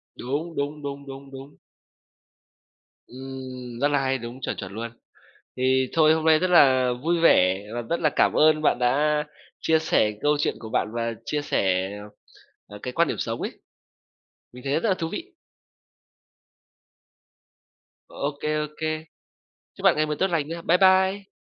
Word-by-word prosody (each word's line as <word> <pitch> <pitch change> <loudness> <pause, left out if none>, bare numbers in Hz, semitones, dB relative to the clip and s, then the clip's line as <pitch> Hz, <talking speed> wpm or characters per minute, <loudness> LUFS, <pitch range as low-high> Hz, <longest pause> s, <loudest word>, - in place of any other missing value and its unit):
Đúng, 150 +6 -4
đúng, 145 +1 -3
đúng, 140 0 -6
đúng, 135 0 -10
đúng. 135 +2 -11 1.5
Ừm, 130 -2 -8
rất 145 - +3
là 145 -1 +1
hay, 135 0 0
đúng, 120 +2 -9
chuẩn, - - -3
chuẩn 95 -1 -6
luôn. 115 +1 -5 0.7
Thì 130 0 +2
thôi 155 -1 +5
hôm 160 0 -2
nay 160 -1 +5
rất 185 +3 0
là 130 -7 +5
vui 170 +2 +1
vẻ 95 - +4
và 120 - -3
rất 170 +9 -2
là 155 -3 +2
cảm - - +4
ơn 155 0 +4
bạn 145 - +2
đã 150 +4 +2 0.4
chia 160 0 +3
sẻ 110 -8 +2
câu 150 0 +3
chuyện 145 - 0
của 110 -1 -9
bạn - - 0
và 115 0 -1
chia 150 -1 -2
sẻ, 95 -5 0 0.8
ờ, 105 0 -11
cái 125 - -4
quan 170 -2 +3
điểm - - -3
sống - - -3
ấy, - - -3 1.0
mình 125 +1 -12
thấy 135 - -1
rất - - 0
là 190 - +3
thú 165 -3 -4
vị. 365 +2 -6 2.8
Ô 140 - -3
kê, 150 - -1
ô - - -8
kê. 155 0 -2 0.7
Chúc - - -13
bạn - - +5
ngày 155 - +1
mới 150 0 -2
tốt 190 - +3
lành 160 -4 0
nha. 165 +1 -6
Bye 170 +2 +3
bye. 190 +1 +3
145 Hz, 175 wpm, -24 LUFS, 125-160 Hz, 2.8 s, thôi